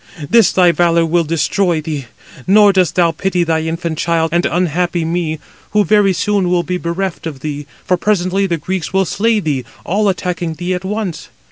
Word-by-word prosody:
this 230 -5 +5
thy 180 -2 +4
valour 170 0 +2
will 170 +1 +1
destroy 165 +2 0
thee; 150 -4 -5 0.4
nor 205 +1 +6
dost 180 -3 +2
thou 170 -2 +3
pity 180 +2 -1
thy 160 -1 0
infant 160 0 -3
child 165 -1 0
and 175 +1 +2
unhappy 175 0 0
me, 165 -1 -2 0.4
who 210 -1 +3
very 205 +1 +4
soon 195 0 0
will 175 -1 +1
be 180 0 -3
bereft 170 0 -3
of 140 -5 -7
thee, 145 -1 -5 0.2
for 180 - +1
presently 195 0 0
the 170 -2 -1
Greeks 180 +3 -4
will 190 0 +2
slay 220 +5 +1
thee, 145 -8 -2 0.2
all 205 +3 +1
attacking 175 -3 -3
thee 175 +3 -3
at 180 0 -4
once. 200 -3 -4
175 Hz, 190 wpm, -16 LUFS, 165-190 Hz, 0.4 s, nor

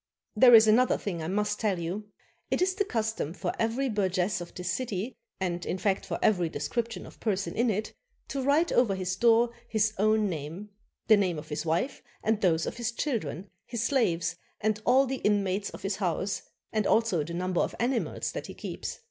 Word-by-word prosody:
There 245 +2 +8
is 220 0 +9
another 240 +4 +4
thing 175 -5 -4
I 160 - -3
must 210 +3 0
tell 205 -4 +1
you. 175 +5 -4 0.4
It - - +1
is 375 +1 +2
the 405 - +1
cus 225 - -1
tom 165 -5 -4
for - - -2
every 230 +4 +1
burgess 190 -3 0
of 175 - -8
this 180 -2 -2
city, 220 +1 -3 0.2
and 175 -2 -2
in - - -2
fact 195 +1 0
for - - -2
every 180 -6 +3
description 230 +6 -3
of - - -14
person 200 -3 -1
in 240 +1 +2
it, 215 +1 -2 0.4
to 275 - -2
write 290 +6 +3
over 220 -6 +3
his 185 -1 -2
door 235 +3 +4 0.2
his 220 -1 +1
own 215 0 +3
name, 165 +4 -5 0.4
the 215 - +6
name 185 -5 +1
of 150 - -8
his 150 +2 -3
wife, 170 - 0 0.2
and 220 0 +1
those 165 -4 +2
of - - -5
his 240 0 -1
children, 205 - -3 0.2
his 235 -2 -2
slaves, 180 -10 +1 0.2
and 215 0 0
all 265 +2 +6
the 265 0 -2
inmates 200 -2 +1
of - - -11
his 195 0 -1
house, 190 +1 -1 0.3
and 215 -2 +1
also 220 -8 +2
the 170 +3 -6
number 180 0 0
of - - -2
animals 240 0 -1
that - - -5
he - - -9
keeps. - - -5
210 Hz, 205 wpm, -28 LUFS, 180-230 Hz, 0.4 s, is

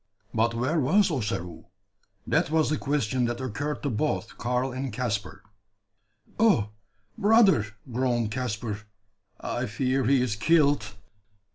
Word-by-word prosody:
But 115 +1 +1
where 130 +8 0
was 185 +8 +3
Ossaroo? 95 - -3 0.6
That - - +1
was 155 -1 +2
the 155 - +1
question 130 -4 0
that 120 0 -2
occurred 140 +4 -4
to 140 - -1
both 115 -1 -2
Karl 125 +2 -1
and 130 +1 -4
Caspar. 110 -3 -3 1.0
"Oh! 200 - +4 0.5
brother!" 205 - +5 0.3
groaned 120 -3 0
Caspar, 110 -3 -3 0.6
"I 120 +1 -3
fear 130 +4 0
he 135 +2 +4
is 125 -4 0
killed!" 145 - +2
125 Hz, 125 wpm, -26 LUFS, 115-145 Hz, 1.0 s, brother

